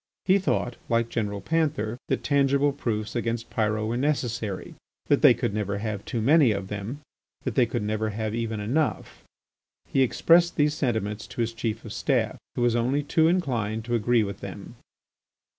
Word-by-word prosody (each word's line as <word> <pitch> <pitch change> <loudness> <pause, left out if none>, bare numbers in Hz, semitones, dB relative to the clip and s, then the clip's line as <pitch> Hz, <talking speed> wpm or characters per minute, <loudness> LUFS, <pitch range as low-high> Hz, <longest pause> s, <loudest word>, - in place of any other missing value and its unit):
He 195 +1 +4
thought, 125 -9 -1
like 115 0 +1
General 105 -4 -2
Panther, 145 -8 -1
that - - -1
tangible 140 0 +2
proofs 110 -6 -3
against 115 0 -2
Pyrot 110 -1 0
were 115 +2 -1
necessary, 120 -8 -2 0.4
that - - +4
they - - +7
could - - -2
never 100 -1 -2
ave 110 -2 -2
too 115 -3 -2
many 145 +1 +5
of 100 -2 -3
them, 105 +8 -5 0.4
that - - -2
they - - +3
could - - -2
never 110 +1 -1
have 110 0 -3
even 115 -2 -2
enough. 135 +10 -2 0.6
He 135 - +1
expressed 170 +6 +4
these' 150 0 +2
sentiments 110 -7 -2
to - - -4
his 115 0 -1
Chief 115 0 -3
of 110 - -7
Staff, - - 0 0.2
who 120 - 0
was 120 -1 +3
only 130 +5 +1
too 160 +2 +3
inclined 120 - 0
to 120 - -3
agree 115 0 +3
with 100 -1 -5
them. - - -8
115 Hz, 175 wpm, -26 LUFS, 110-140 Hz, 0.6 s, they